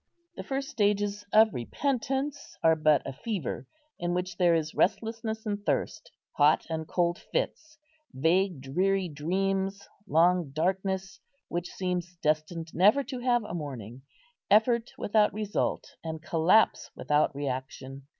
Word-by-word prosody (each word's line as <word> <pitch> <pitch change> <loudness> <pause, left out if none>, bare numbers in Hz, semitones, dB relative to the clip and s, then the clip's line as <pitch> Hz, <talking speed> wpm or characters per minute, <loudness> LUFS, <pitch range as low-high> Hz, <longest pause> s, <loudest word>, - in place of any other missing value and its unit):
The - - -5
first 275 +1 -3
stages 205 -3 0
of 220 0 +6
repentance 270 - -2
are 160 0 +6
but 155 -3 +3
a 135 - -5
fever, 210 - -4 0.3
in 175 0 -1
which 180 0 -3
there 175 -2 +4
is 160 -1 -1
restlessness 220 +2 -1
and 205 -1 -3
thirst, - - -2 0.2
hot 150 +1 +3
and 160 -1 -3
cold 175 0 0
fits, 325 -10 -4 0.3
vague, 165 +2 +1
dreary 185 +7 0
dreams, 190 +5 -2 0.2
long 170 -1 +3
darkness 190 +3 -1 0.3
which 175 0 -3
seems 180 -1 -3
destined 160 +1 -1
never 210 +11 +5
to 260 0 -6
have 240 -1 +2
a 210 - -7
morning, 130 - -6 0.5
effort 230 +3 +4
without 210 0 +2
result, 210 -1 -2
and 160 -1 -5
collapse 175 +8 +3
without 150 -1 +1
reaction. 135 0 -5
180 Hz, 130 wpm, -28 LUFS, 160-215 Hz, 0.5 s, of